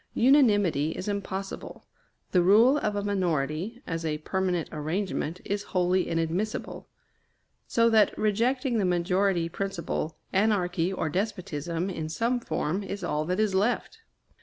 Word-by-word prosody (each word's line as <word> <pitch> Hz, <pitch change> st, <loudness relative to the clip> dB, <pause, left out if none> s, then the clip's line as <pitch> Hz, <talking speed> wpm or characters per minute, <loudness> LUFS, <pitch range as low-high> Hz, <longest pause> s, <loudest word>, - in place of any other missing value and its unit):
Unanimity 205 Hz, -, +4 dB
is 185 Hz, -, -6 dB
impossible; 195 Hz, -1 st, -5 dB, 0.5 s
the 180 Hz, -, +4 dB
rule 225 Hz, +10 st, +5 dB
of 210 Hz, -5 st, -1 dB
a 205 Hz, -, -1 dB
minority, 185 Hz, -, -1 dB
as 165 Hz, 0 st, -3 dB
a 155 Hz, -2 st, -1 dB
permanent 180 Hz, +1 st, -1 dB
arrangement, 165 Hz, +2 st, -2 dB
is 205 Hz, 0 st, -1 dB, 0.2 s
wholly 180 Hz, +1 st, +2 dB
inadmissible. 165 Hz, +6 st, -2 dB, 0.8 s
So 230 Hz, 0 st, +3 dB
that, 215 Hz, -2 st, +4 dB
rejecting 235 Hz, +4 st, +1 dB
the -, -, +1 dB
majority 180 Hz, 0 st, +1 dB
principle, 170 Hz, -3 st, -3 dB, 0.2 s
anarchy 190 Hz, -3 st, +1 dB
or 185 Hz, -4 st, -2 dB
despotism, 180 Hz, -2 st, -2 dB
in 160 Hz, -3 st, -4 dB
some 235 Hz, +8 st, 0 dB
form, 185 Hz, -5 st, -2 dB
is 200 Hz, 0 st, -6 dB
all 150 Hz, +1 st, -1 dB
that 180 Hz, +4 st, -1 dB
is 215 Hz, -2 st, +2 dB
left. 235 Hz, -, 0 dB
190 Hz, 135 wpm, -27 LUFS, 170-210 Hz, 0.8 s, rule